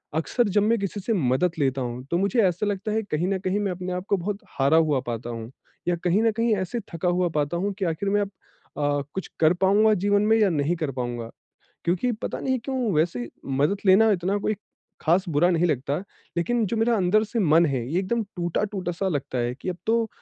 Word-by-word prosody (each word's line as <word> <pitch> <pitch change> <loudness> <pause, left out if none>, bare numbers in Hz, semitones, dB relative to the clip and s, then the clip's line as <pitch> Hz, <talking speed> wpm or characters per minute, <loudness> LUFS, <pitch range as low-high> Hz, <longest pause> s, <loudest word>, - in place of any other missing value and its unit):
अक्सर 220 +9 +1
जब 205 +2 +3
मैं 230 +2 +2
किसी 200 +1 -3
से 225 +4 -1
मदद 145 - +2
लेता 135 -2 +1
हूँ 125 0 -4
तो 170 - +2
मुझे 200 +6 +2
ऐसा 180 +3 -1
लगता 205 +1 -2
है 220 +1 +1
कहीं 160 +4 0
न 195 0 0
कहीं 185 +2 -1
मैं 200 -2 -1
अपने 180 +1 -5
आपको 185 +2 -1
बहुत 195 +3 -3 0.2
हारा 140 +4 +4
हुआ 155 -4 +3
पाता 120 0 -4
हूँ 115 0 -6 0.4
या 175 - +2
कहीं 180 +4 +3
न 225 - +4
कहीं 230 0 +1
ऐसे 190 +4 -2
थका 165 +2 -2
हुआ 175 0 +1
पाता 150 +3 0
हूँ 200 +4 -1
कि 195 - 0
आखिर 170 +4 -1
में 205 +1 +2
अब 200 -1 -3 0.5
अ, 145 -1 +1
कुछ 190 - -4
कर 160 +1 +5
पाऊँगा 210 +3 +5
जीवन 205 +1 +2
में 220 +2 +4
या 210 -3 +4
नहीं 155 0 0
कर 155 -4 -2
पाऊँगा? 120 -3 -4 0.6
क्योंकि 180 +9 +1
पता 225 +2 -4
नहीं 260 -1 0
क्यों 255 -5 -1
वैसे 150 -7 0 0.2
मदद 140 +8 +1
लेना 210 +4 +6
इतना 190 0 +1
कोई 215 +1 -1 0.5
खास 175 +4 +2
बुरा 165 +2 +3
नहीं 170 -1 +2
लगता, 140 -2 -1 0.4
लेकिन 230 +7 +1
जो 230 - -2
मेरा 230 +2 +2
अंदर 205 +3 +3
से 225 +2 -4
मन 170 -4 +5
है 130 -5 -1
ये 175 - +2
एकदम 225 +5 0
टूटा-टूटा 180 +1 -2
सा 190 +3 -1
लगता 145 -6 -2
है 120 0 -1
कि - - -6
अब 180 - -2
तो 225 0 +2
180 Hz, 225 wpm, -25 LUFS, 155-205 Hz, 0.6 s, लेना